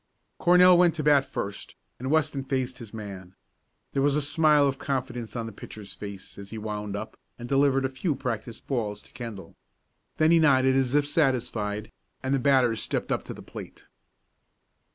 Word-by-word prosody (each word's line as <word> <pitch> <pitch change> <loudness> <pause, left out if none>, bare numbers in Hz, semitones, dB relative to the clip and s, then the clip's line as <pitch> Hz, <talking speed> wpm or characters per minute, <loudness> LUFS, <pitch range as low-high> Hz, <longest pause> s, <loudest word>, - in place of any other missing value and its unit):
Cornell 180 0 +7
went 175 -2 +4
to 155 - -3
the - - -7
bat 140 -2 +5
first, 100 -4 -5 0.2
and 130 +2 -3
Weston 155 -2 +1
faced 130 -1 -2
his 115 -4 -9
man. 95 -4 -8 0.6
There 135 - +1
was 140 0 +3
a 150 - +2
smile 150 0 +4
of 135 -1 -1
confidence 125 -4 -3
on 115 -1 -2
the 115 - -6
pitcher's 100 -1 -9
face, 100 -2 -9
as 100 0 -9
he 110 - -7
wound 105 -1 -4
up, 110 +2 -7 0.2
and 120 - -7
delivered 135 0 +3
a - - 0
few 140 +4 -2
practice 115 -3 -4
balls 105 -6 -3
to - - -20
Kendall. 115 -6 -8 0.6
Then 155 +1 +4
he 170 - +6
nodded 130 -4 +4
as 135 0 +2
if 145 -1 +4
satisfied, 115 -8 0 0.3
and 130 +1 0
the 135 - +2
batter 130 -3 +4
stepped 110 - -3
up - - +1
to - - -6
the - - -11
plate. - - -10
130 Hz, 190 wpm, -27 LUFS, 110-140 Hz, 0.6 s, Cornell